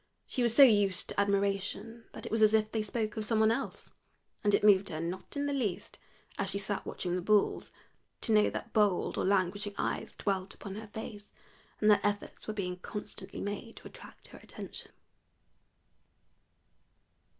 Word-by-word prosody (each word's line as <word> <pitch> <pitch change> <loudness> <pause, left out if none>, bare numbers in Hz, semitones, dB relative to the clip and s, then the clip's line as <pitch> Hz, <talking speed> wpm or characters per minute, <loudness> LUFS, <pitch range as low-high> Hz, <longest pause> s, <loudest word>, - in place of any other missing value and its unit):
She 255 - -2
was 235 -1 +2
so 280 - +10
used 205 -6 +4
to - - -2
admiration 200 +3 0
that - - -8
it - - -6
was 220 0 +1
as 215 0 +6
if 215 0 +1
they 220 - 0
spoke 215 0 -2
of 215 - -1
some 220 +1 +1
one 220 0 +5
else, 270 +4 -4 0.5
and 205 -1 +4
it - - 0
moved 200 -2 +5
her 155 - -4
not 175 - -5
in 285 - 0
the 285 - -1
least, 225 -10 -3 0.4
as 200 -1 0
she 200 - -2
sat 200 0 -3
watching 180 -1 -2
the 180 - -1
bulls, 210 +2 +2 0.5
to - - +1
know 210 -1 +5
that 225 - -6
bold 205 -5 +2
or - - +1
languishing 200 +1 +1
eyes - - -2
dwelt 195 -1 -2
upon 195 - -8
her 215 +2 -7
face, 210 -1 -8 0.5
and 210 - +2
that 205 - +4
efforts 205 0 -2
were 215 - -2
being 180 -3 -3
constantly 205 0 -7
made 205 +3 -5
to - - -11
attract - - -13
her - - -12
attention. - - -8
205 Hz, 185 wpm, -31 LUFS, 195-220 Hz, 0.5 s, so